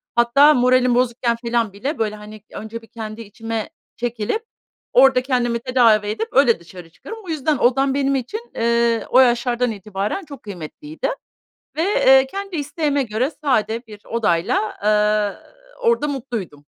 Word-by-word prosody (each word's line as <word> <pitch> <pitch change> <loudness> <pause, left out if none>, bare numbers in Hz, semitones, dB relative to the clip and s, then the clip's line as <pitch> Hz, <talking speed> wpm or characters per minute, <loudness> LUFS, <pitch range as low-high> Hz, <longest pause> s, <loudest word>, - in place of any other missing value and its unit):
Hatta 275 +6 +6
moralim 250 -1 +3
bozukken 240 -1 +1
felan 230 -3 -1
bile, 270 +10 -4
böyle, 215 -1 -1
hani, 210 0 -11
önce 225 +2 -7
bir 225 - -17
kendi 220 -1 -7
içime 225 +1 -5 0.3
çekilip, 240 - -3 0.5
orada 260 0 +6
kendimi 240 -3 0
tedavi 230 -4 +3
edip, 220 +2 -2
öyle 250 -7 +4
dışarı 170 0 -13
çıkarım. 450 - -10
O - - -10
yüzden 310 -2 0
odam 270 +3 +2
benim 275 0 +1
için, 430 - -5
eee, 235 0 +1
o 255 - +5
yaşlardan 245 -1 +2
itibaren 210 - -4
çok 280 -2 -11
kıymetliydi. 215 - -6 0.7
Ve, 320 - +1
eee, 265 -8 +5
kendi 395 +3 -6
isteğime 290 -1 -1
göre 235 +4 -1
sade 230 -3 0
bir 210 -2 -12
odayla, 215 -2 0
eee, 210 -1 +1 0.3
orada 470 -11 +2
mutluydum. 230 - -5
240 Hz, 145 wpm, -20 LUFS, 215-270 Hz, 0.7 s, Hatta